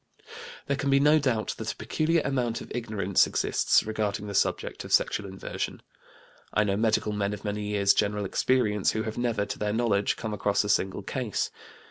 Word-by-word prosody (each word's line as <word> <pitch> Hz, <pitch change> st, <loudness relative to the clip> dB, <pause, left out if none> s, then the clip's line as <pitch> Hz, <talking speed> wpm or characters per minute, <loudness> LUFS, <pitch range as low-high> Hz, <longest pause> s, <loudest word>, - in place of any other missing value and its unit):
There 140 Hz, -, 0 dB
can 140 Hz, 0 st, -2 dB
be 135 Hz, 0 st, +5 dB
no 150 Hz, +2 st, +5 dB
doubt 125 Hz, -7 st, 0 dB
that 110 Hz, 0 st, -2 dB
a -, -, -24 dB
peculiar 160 Hz, 0 st, 0 dB
amount 125 Hz, -4 st, -1 dB
of -, -, -11 dB
ignorance 105 Hz, -6 st, +1 dB
exists -, -, +2 dB
regarding 105 Hz, -2 st, -2 dB
the 100 Hz, -, -6 dB
subject -, -, 0 dB
of -, -, -9 dB
sexual 100 Hz, -, +2 dB
inversion. 95 Hz, 0 st, -5 dB, 0.7 s
I 105 Hz, -, +2 dB
know 100 Hz, -2 st, 0 dB
medical 110 Hz, 0 st, +1 dB
men 100 Hz, 0 st, -1 dB
of 105 Hz, -, -13 dB
many 105 Hz, 0 st, -2 dB
years' 100 Hz, -1 st, +3 dB
general 105 Hz, 0 st, 0 dB
experience 105 Hz, -1 st, +1 dB
who 110 Hz, -, -1 dB
have 110 Hz, +2 st, -4 dB
never, 115 Hz, -4 st, 0 dB
to 100 Hz, -, -6 dB
their 105 Hz, 0 st, -1 dB
knowledge, 110 Hz, -3 st, +1 dB
come 110 Hz, -2 st, -4 dB
across 100 Hz, 0 st, +1 dB
a 105 Hz, -, -4 dB
single 95 Hz, 0 st, +1 dB
case. 120 Hz, -1 st, -2 dB
105 Hz, 190 wpm, -27 LUFS, 100-120 Hz, 0.7 s, be